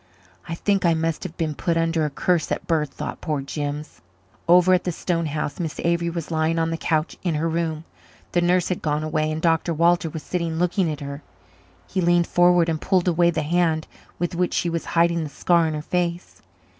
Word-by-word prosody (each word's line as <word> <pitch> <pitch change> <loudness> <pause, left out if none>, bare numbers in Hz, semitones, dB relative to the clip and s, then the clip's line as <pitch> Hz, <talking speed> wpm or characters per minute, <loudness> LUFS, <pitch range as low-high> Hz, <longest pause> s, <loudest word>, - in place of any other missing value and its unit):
"I 165 - -2
think 200 +2 0
I 170 -2 +4
must 165 0 -1
have 170 -2 -7
been 160 -2 -1
put 165 +3 -1
under 165 -1 +1
a - - -1
curse 165 +2 0
at - - -2
birth," 155 -3 0
thought - - -6
poor 155 -4 -1
Jims. 145 - -5 0.5
Over 180 +1 +6
at 180 - +3
the 180 - -1
stone 170 0 -1
house 150 -1 -3
Miss 165 -3 -4
Avery 170 0 +1
was 170 -1 -5
lying 160 +1 +1
on 165 0 +1
the - - -1
couch 160 0 -1
in 175 -4 -1
her 155 +2 0
room. 165 -1 -2 0.5
The 175 - +2
nurse 175 0 +2
had 180 - -2
gone 150 0 -1
away 155 0 0
and 155 - -2
Dr. 165 0 +2
Walter 170 +1 +3
was 155 -1 -7
sitting 170 -3 -2
looking 180 0 +1
at 150 -1 -6
her. 140 +1 -6 0.6
He 190 - -2
leaned 175 0 +3
forward 175 -1 +4
and 160 -2 -1
pulled 185 -2 +1
away 170 0 +4
the 160 -2 -1
hand 160 0 +1 0.3
with 175 +1 -2
which 180 +1 0
she 170 - 0
was 165 -1 -3
hiding 170 0 +3
the 150 - -5
scar 170 +2 +2
on 155 - -2
her 150 - -4
face. 175 +1 -2
165 Hz, 220 wpm, -23 LUFS, 155-175 Hz, 0.6 s, Over